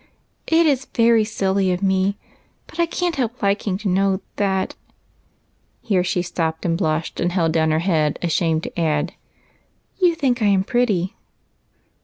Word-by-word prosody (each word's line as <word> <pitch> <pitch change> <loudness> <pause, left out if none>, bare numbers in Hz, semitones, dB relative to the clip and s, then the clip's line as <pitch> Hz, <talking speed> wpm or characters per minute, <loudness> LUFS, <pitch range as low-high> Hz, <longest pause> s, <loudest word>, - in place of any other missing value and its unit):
" - - -46
It 330 +1 +4
is 275 -3 +1
very 230 -2 +4
silly 195 -3 0
of 180 +2 -2
me, 190 +1 +1 0.5
but - - -14
I 340 - +3
can't 345 -1 -2
help 245 -3 -3
liking 200 -1 0
to 210 +1 -5
know 190 +1 +1 0.2
that 190 -2 0 0.4
" - - -41
— - - -43
here 190 -5 +1
she 180 -1 -1
stopped 160 -2 -3
and 165 -1 +1
blushed 160 -2 -2
and 175 - 0
held 170 -3 +1
down 160 -1 +2
her 155 - +2
head, 155 -5 +1
ashamed 165 -1 +1
to - - -6
add, 155 +1 0 0.9
"you 355 -3 +3
think 255 -6 0
I 210 - +3
am 195 -2 +3
pretty." 210 -4 0
190 Hz, 175 wpm, -21 LUFS, 170-230 Hz, 0.9 s, It